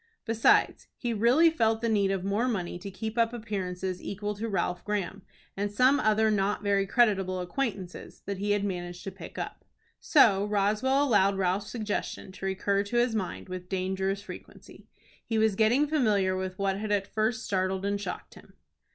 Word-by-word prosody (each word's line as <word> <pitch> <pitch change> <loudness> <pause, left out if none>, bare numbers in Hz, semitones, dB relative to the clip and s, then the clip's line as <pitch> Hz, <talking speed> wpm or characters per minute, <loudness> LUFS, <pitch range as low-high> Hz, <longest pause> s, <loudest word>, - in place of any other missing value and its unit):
Besides, 225 0 +3
he 240 -2 -2
really 250 +10 +4
felt 225 -7 +1
the 235 - 0
need 205 -3 +2
of 195 -2 -1
more 205 +5 0
money 180 -7 -2
to 200 +2 -7
keep 220 +4 -4
up 230 0 +2
appearances 190 -5 -4
equal 205 +1 -4
to 220 +3 -4
Ralph 180 -2 -1
Graham, 200 -2 -3 0.3
and 205 +1 -2
some 255 +7 +4
other 215 0 +3
not 205 0 0
very 200 -1 +1
creditable 195 -6 +2
acquaintances 185 -1 -4
that 200 -1 -4
he 205 +1 -2
had 205 -1 +2
managed 175 -2 -4
to 195 - -5
pick - - -11
up. - - -6 0.4
So 205 - +4
Roswell 210 +7 +2
allowed 200 -7 +3
Ralph's 190 +2 0
suggestion 215 -4 -4
to 190 0 -5
recur 200 +1 0
to 205 +4 -3
his 240 -1 +2
mind 200 -3 -3
with 185 -1 -7
dangerous 190 +1 -1
frequency. - - -12 0.4
He 225 - -2
was 220 -1 +3
getting 230 +8 +3
familiar 215 -11 +2
with 185 0 -4
what 195 -1 0
had 215 0 -3
at 200 -1 +1
first 220 +3 -1
startled 190 -1 -1
and 200 0 -1
shocked 185 -3 -6
him. - - -16
205 Hz, 180 wpm, -28 LUFS, 190-220 Hz, 0.4 s, really